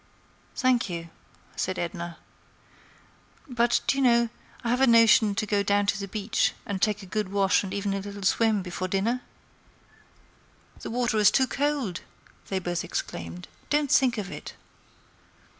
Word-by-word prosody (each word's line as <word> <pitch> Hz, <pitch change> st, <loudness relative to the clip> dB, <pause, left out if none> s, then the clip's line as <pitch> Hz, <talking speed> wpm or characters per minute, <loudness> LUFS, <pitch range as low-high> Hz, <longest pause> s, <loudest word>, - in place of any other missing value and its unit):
"Thank 255 Hz, -5 st, +2 dB
you," 170 Hz, -1 st, -6 dB, 0.4 s
said 185 Hz, 0 st, -2 dB
Edna. 170 Hz, 0 st, -4 dB, 1.3 s
"But, 240 Hz, -2 st, +2 dB
do 275 Hz, -, +1 dB
you -, -, +2 dB
know, 235 Hz, -2 st, +4 dB, 0.3 s
I 235 Hz, -, 0 dB
have 250 Hz, +2 st, +1 dB
a 270 Hz, -, +5 dB
notion 230 Hz, -3 st, +6 dB
to 215 Hz, -, -1 dB
go 205 Hz, -1 st, +1 dB
down 205 Hz, 0 st, +2 dB
to 200 Hz, 0 st, 0 dB
the 200 Hz, -, -4 dB
beach 210 Hz, +2 st, 0 dB
and 200 Hz, -4 st, -4 dB
take 210 Hz, -1 st, +1 dB
a -, -, -9 dB
good 210 Hz, +1 st, -2 dB
wash 195 Hz, -1 st, +2 dB
and 190 Hz, -, -6 dB
even 200 Hz, 0 st, -2 dB
a 195 Hz, -, -1 dB
little 200 Hz, 0 st, -8 dB
swim, 215 Hz, 0 st, +2 dB
before 185 Hz, +1 st, -4 dB
dinner?" 215 Hz, +7 st, 0 dB, 1.6 s
"The -, -, -7 dB
water 240 Hz, -1 st, 0 dB
is 210 Hz, -1 st, +7 dB
too 265 Hz, -, +3 dB
cold!" 275 Hz, -10 st, -1 dB, 0.5 s
they 195 Hz, -, -2 dB
both 175 Hz, -2 st, -2 dB
exclaimed. 85 Hz, +1 st, -5 dB, 0.2 s
"Don't 295 Hz, -1 st, +1 dB
think 250 Hz, -3 st, +4 dB
of 195 Hz, -2 st, -4 dB
it." -, -, -8 dB
205 Hz, 160 wpm, -26 LUFS, 190-235 Hz, 1.6 s, is